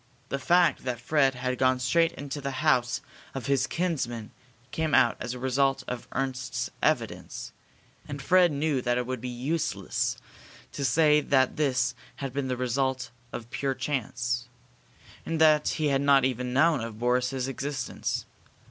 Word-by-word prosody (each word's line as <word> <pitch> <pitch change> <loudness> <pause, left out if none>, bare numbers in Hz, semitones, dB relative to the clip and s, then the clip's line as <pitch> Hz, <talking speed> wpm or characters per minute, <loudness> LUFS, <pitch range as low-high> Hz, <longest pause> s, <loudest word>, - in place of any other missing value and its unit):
The 140 - -2
fact 175 +2 +3
that 125 -2 -3
Fred 135 0 +2
had 125 0 -2
gone 130 0 +4
straight 165 +3 +1
to 145 - -3
the 135 -1 -3
house 125 -1 +3 0.3
of 130 -4 -4
his 140 +1 +2
kinsman 125 -11 -2 0.4
came 160 -2 0
out 120 - +5
as 125 - -4
a - - -6
result 135 +1 +1
of 125 -1 -5
Ernst's 130 -1 -2
evidence, - - -1 0.6
and 140 - -5
Fred 180 +3 +4
knew 145 -2 0
that 120 0 +1
it 125 - -1
would 130 -1 -4
be 125 - -4
useless 135 +7 -1 0.5
to 140 - -4
say 150 +3 +4
that 130 -3 +2
this 130 -4 +1 0.2
had 135 -3 -5
been 140 -1 -2
the 125 -1 -2
result 130 0 -1 0.2
of 120 0 -7
pure 135 -1 -1
chance, 125 -3 -2 0.8
and 165 -1 -2
that 155 -1 +5
he 155 -2 +1
had 135 -1 +2
not 140 -2 +5
even 125 -1 -1
known 145 +1 +3
of 115 -2 -6
Boris's 125 +2 0
existence. 135 -1 -3
130 Hz, 160 wpm, -27 LUFS, 125-145 Hz, 0.8 s, out